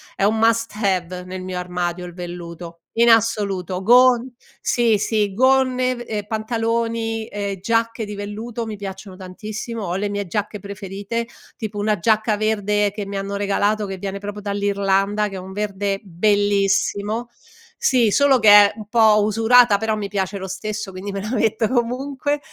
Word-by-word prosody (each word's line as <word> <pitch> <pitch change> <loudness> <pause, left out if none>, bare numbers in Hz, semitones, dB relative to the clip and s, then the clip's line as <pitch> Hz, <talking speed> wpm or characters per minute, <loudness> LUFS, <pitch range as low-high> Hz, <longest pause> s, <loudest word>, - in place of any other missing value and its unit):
è - - -2
un 215 +2 +3
must 230 0 +2
have 180 -2 -1
nel 185 0 -6
mio 185 -1 -5
armadio 180 0 -3
il 175 - -9
velluto 170 -1 -8
in 235 +1 +4
assoluto, 200 -5 +1
gon 245 +2 +5 0.3
sì, 230 -3 +2
sì 210 -1 0
gonne 255 +1 +2
v 240 - -6
ehm, 210 -2 -3
pantaloni 225 0 -2
e 200 -2 -4
giacche 230 +1 0
di 205 0 -7
velluto 220 +3 -5
mi 215 -2 -6
piacciono 190 -1 -8
tantissimo, 210 +4 -6
ho 175 -1 -2
le 205 +1 -1
mie 205 0 -3
giacche 210 +3 -3
preferite, 200 +3 -5 0.3
tipo 210 -2 -5
una 210 -2 0
giacca 215 +2 +2
verde 210 -1 +1
che 205 -1 -5
mi 200 0 -5
hanno 200 +1 -4
regalato, 205 +1 0
che 190 -1 -5
viene 195 +1 -5
proprio 205 +1 -6
dall'Irlanda, 200 0 0
che 195 - -8
è - - -5
un 190 +1 -9
verde 200 -1 -2
bellissimo; 205 +3 +1 0.5
sì 240 -5 +3
solo 275 -1 +4
che 215 - +2
è 205 0 +8
un 210 -2 -9
po' 215 -1 +5
usurata 225 +1 +5
però 220 0 -1
mi 205 -1 -3
piace 195 0 -2
lo 190 0 -6
stesso 210 +1 -5
quindi 190 +2 -6
me 195 0 -4
la 215 +3 -5
metto 220 -1 +1
comunque, 265 +4 -1
205 Hz, 170 wpm, -21 LUFS, 195-225 Hz, 0.5 s, è